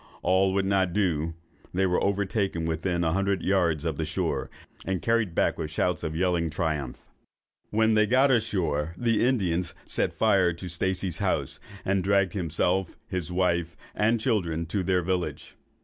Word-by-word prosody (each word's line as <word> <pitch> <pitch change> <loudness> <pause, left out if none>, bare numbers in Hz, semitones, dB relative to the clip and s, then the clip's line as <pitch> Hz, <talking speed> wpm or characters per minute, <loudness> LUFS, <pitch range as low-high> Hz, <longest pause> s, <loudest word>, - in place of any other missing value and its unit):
All 95 +1 +3
would 100 -1 +1
not 95 -2 +1
do; 85 -5 0 0.4
they 95 +1 +3
were 90 -1 +1
overtaken 100 -3 0
within 85 +2 -1
a 80 -1 +1
hundred 100 -1 0
yards 85 -5 +1
of 80 -3 -2
the 80 - -1
shore, 80 0 -2 0.3
and 95 -1 -1
carried 115 -6 0
back - - +1
with 75 - -3
shouts 80 +1 0
of 80 0 -3
yelling 85 -1 +1
triumph. 75 -5 -2 0.7
"When 110 +1 +3
they 110 0 +4
got 130 +4 +4
ashore, 85 - 0
the 115 -2 +1
Indians 90 -9 0
set - - 0
fire 95 -6 +3
to 90 +3 -8
Stacey's 90 +1 -1
house, - - -1 0.3
and 95 -1 +1
dragged 100 -2 +2
himself, 90 +1 -1
his 90 -3 -3
wife, 85 -2 0 0.2
and 115 +2 +2
children, 90 -9 0
to 100 - +1
their 90 -1 +1
village. 90 0 -3
90 Hz, 165 wpm, -27 LUFS, 85-100 Hz, 0.7 s, they